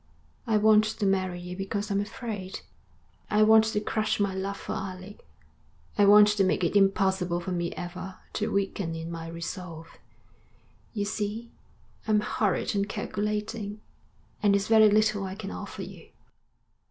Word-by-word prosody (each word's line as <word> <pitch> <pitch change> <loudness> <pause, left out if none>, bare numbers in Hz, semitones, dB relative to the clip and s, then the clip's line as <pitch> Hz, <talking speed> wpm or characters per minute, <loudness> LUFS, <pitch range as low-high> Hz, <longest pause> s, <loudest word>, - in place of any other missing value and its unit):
I 220 -2 +3
want 215 0 +6
to 215 -1 -2
marry 185 -2 0
you 180 0 -7
because 200 +2 -3
I'm 200 0 +1
afraid. 205 -3 -6 0.7
I 210 0 +4
want 220 0 +7
to 220 -1 0
crush 215 0 -1
my 200 -2 +1
love 195 +1 -3
for - - -5
Alec. 190 +1 -7 0.7
I 205 - +5
want 210 +1 +8
to 210 -1 +2
make 185 -1 +1
it 170 - 0
impossible 190 -3 +2
for 175 +2 -5
me 175 -1 -1
ever 180 +2 -7 0.2
to 215 - -1
weaken 195 -4 -1
in 165 +1 -6
my 165 -1 -6
resolve. 170 0 -7 1.0
You 205 -1 -1
see, 215 +3 -3 0.6
I'm 215 -1 +3
horrid 210 -1 0
and 200 0 0
calculating, 210 0 -3 0.6
and 205 -1 +4
it's 200 0 0
very 220 -1 +7
little 215 -1 +2
I 190 0 -5
can 205 -1 -6
offer - - -6
you.' - - -11
200 Hz, 155 wpm, -27 LUFS, 185-210 Hz, 1.0 s, want